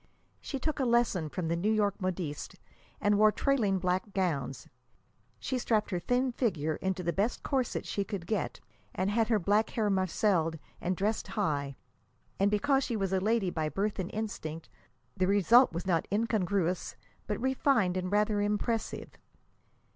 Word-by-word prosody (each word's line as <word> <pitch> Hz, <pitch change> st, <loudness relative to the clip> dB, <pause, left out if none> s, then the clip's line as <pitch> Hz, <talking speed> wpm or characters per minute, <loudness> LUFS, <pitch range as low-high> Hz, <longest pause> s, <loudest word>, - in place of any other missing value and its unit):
She 275 Hz, -, -5 dB
took 305 Hz, +3 st, -2 dB
a -, -, +2 dB
lesson 235 Hz, -9 st, +2 dB
from 175 Hz, +1 st, -3 dB
the 165 Hz, -, 0 dB
New 180 Hz, +5 st, 0 dB
York 205 Hz, -2 st, +1 dB
modistes, 175 Hz, -5 st, -3 dB, 0.4 s
and 205 Hz, 0 st, +2 dB
wore 215 Hz, 0 st, +6 dB
trailing 220 Hz, -7 st, +1 dB
black 185 Hz, +2 st, -1 dB
gowns. 140 Hz, -9 st, -1 dB, 0.7 s
She 260 Hz, -2 st, -2 dB
strapped 215 Hz, -3 st, 0 dB
her 180 Hz, -, 0 dB
thin 250 Hz, +7 st, +1 dB
figure 160 Hz, -, -1 dB
into 190 Hz, -1 st, -2 dB
the 170 Hz, 0 st, 0 dB
best 210 Hz, +5 st, -1 dB
corset 265 Hz, -4 st, -1 dB
she 200 Hz, -, -1 dB
could 195 Hz, -4 st, -5 dB
get, 205 Hz, +1 st, -2 dB, 0.4 s
and 190 Hz, +2 st, 0 dB
had 225 Hz, +1 st, +2 dB
her 225 Hz, -, +3 dB
black 205 Hz, +3 st, +2 dB
hair 215 Hz, -3 st, 0 dB
marcelled 185 Hz, -3 st, +1 dB, 0.2 s
and 180 Hz, 0 st, -1 dB
dressed 215 Hz, +3 st, -1 dB
high. 145 Hz, -10 st, -1 dB, 0.6 s
And, 200 Hz, +1 st, +4 dB
because 270 Hz, +7 st, +2 dB
she 235 Hz, -, -2 dB
was 195 Hz, -3 st, -1 dB
a 190 Hz, -, +3 dB
lady 210 Hz, -1 st, +1 dB
by 155 Hz, -2 st, -1 dB
birth 205 Hz, +4 st, -2 dB
and 185 Hz, -1 st, -2 dB
instinct, 165 Hz, -7 st, -5 dB, 0.5 s
the 185 Hz, -, +1 dB
result 205 Hz, +6 st, +5 dB
was 170 Hz, +2 st, -4 dB
not 170 Hz, -4 st, +1 dB
incongruous, 200 Hz, -5 st, 0 dB, 0.3 s
but 210 Hz, -, -2 dB
refined 260 Hz, -7 st, +2 dB
and 185 Hz, 0 st, -2 dB
rather 210 Hz, 0 st, +2 dB
impressive. 210 Hz, +2 st, -2 dB
200 Hz, 165 wpm, -30 LUFS, 180-220 Hz, 0.7 s, wore